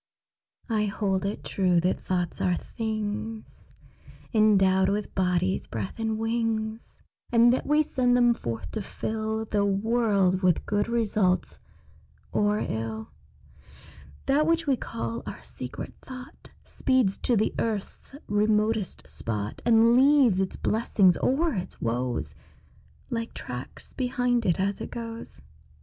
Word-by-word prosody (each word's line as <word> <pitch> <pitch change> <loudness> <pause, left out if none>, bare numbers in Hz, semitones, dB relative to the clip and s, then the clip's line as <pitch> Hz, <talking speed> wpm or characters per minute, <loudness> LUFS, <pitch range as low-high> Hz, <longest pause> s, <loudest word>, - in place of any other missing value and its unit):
I 215 -2 +1
hold 195 -1 -1
it 205 - -4
true 180 -3 +2
that 180 +2 0
thoughts 180 -2 -2
are 180 -1 +2
things 215 +1 -5 0.6
Endowed 195 -3 +4
with 205 +1 -2
bodies, 185 0 0
breath, 105 - -5
and 220 -1 -1
wings, 225 0 -2 0.3
And 240 0 +6
that 260 - -2
we 300 +1 +4
send 250 -3 +2
them 240 -1 +5
forth 115 - -5
to 220 - -3
fill 220 +2 -3
The 205 -1 0
world 200 -2 +2
with 180 -4 +2
good 205 +1 0
results 215 -5 0 0.7
or 210 0 +2
ill. 110 0 -4 1.1
That 295 +3 +3
which 330 0 +2
we 275 -2 +3
call 115 - -4
our - - -7
secret 125 0 -7
thought 255 0 -11
Speeds 255 -7 +1
to 240 - +1
the 215 - +1
earth's 220 +4 -3
remotest 210 -1 +1
spot, 105 -2 -4
And 230 0 +6
leaves 265 -6 +5
its 190 -1 -1
blessings 205 -5 +3
or 310 +4 +1
its 185 -2 -5
woes 120 - -2 0.8
Like 230 -1 -3
tracks 125 +1 -8
behind 245 -2 0
it 175 - +2
as 195 +1 -1
it - - -5
goes. 230 - -7
215 Hz, 130 wpm, -27 LUFS, 185-235 Hz, 1.1 s, And